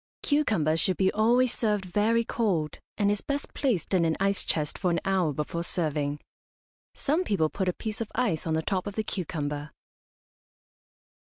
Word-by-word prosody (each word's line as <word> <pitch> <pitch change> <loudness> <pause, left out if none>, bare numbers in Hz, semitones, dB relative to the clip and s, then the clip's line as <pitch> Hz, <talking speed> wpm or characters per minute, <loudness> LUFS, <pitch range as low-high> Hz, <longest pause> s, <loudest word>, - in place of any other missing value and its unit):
Cucumber 215 - +2
should 185 +2 +1
be 190 -1 +3
always 240 +3 +4
served 210 -4 0
very 215 +5 +2
cold, 185 -11 -1 0.2
and 205 -1 +3
is 205 - -1
best 285 +1 -3
placed 235 - 0
in 180 -3 +4
an 160 -1 +1
ice 195 0 +2
chest 150 -2 -1
for 185 - +1
an 170 - +1
hour 190 -5 +2
before 150 +4 -3
serving. 150 -4 -1 0.8
Some 310 +6 +1
people 185 - +1
put 190 -2 -1
a - - 0
piece 220 +3 -5
of 225 - -4
ice 190 -11 0
on 160 - +1
the 160 - 0
top 190 +1 -1
of 200 - -5
the 220 - 0
cucumber. 150 -6 -3
190 Hz, 175 wpm, -28 LUFS, 160-220 Hz, 0.8 s, always